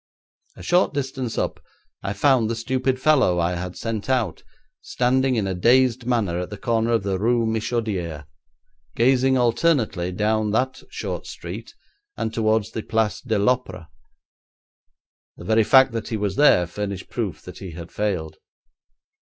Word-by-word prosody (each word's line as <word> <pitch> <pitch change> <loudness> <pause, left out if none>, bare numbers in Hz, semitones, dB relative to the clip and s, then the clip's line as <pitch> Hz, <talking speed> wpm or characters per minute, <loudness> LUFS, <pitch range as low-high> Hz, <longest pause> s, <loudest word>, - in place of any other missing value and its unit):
A - - -11
short 175 -3 +2
distance 130 -4 -3
up - - -2 0.4
I 100 0 -3
found 120 +1 +3
the 115 - -1
stupid 130 +2 -1
fellow 130 -11 +3
I 85 +1 +1
had 90 0 -5
sent 115 0 -4
out, 125 -5 0 0.4
standing 130 +1 +1
in 110 -4 0
a 95 - -1
dazed 120 +5 +3
manner 105 -9 0
at 90 - -4
the 105 - -7
corner 115 +1 0
of 115 -3 +1
the 95 -1 -1
Rue 115 +2 +2
Michodière, 110 - -2 0.7
gazing 130 +2 +3
alternately 120 - +1
down 105 +3 0
that 130 +3 0
short 440 +2 -5
street - - -8 0.4
and 110 - -2
towards 110 -1 +1
the 110 - -4
Place 110 -2 -1
de 110 -4 -1
l'Opéra. 100 -6 -1 1.5
The - - -10
very 110 +3 +3
fact 130 +3 +6
that 115 -1 -4
he 110 - -2
was 100 -2 -2
there 145 -12 +5
furnished 100 +2 -5
proof - - -4
that - - -10
he 95 -4 -8
had 85 +1 -9
failed. 85 -7 -2
110 Hz, 155 wpm, -23 LUFS, 100-125 Hz, 1.5 s, fact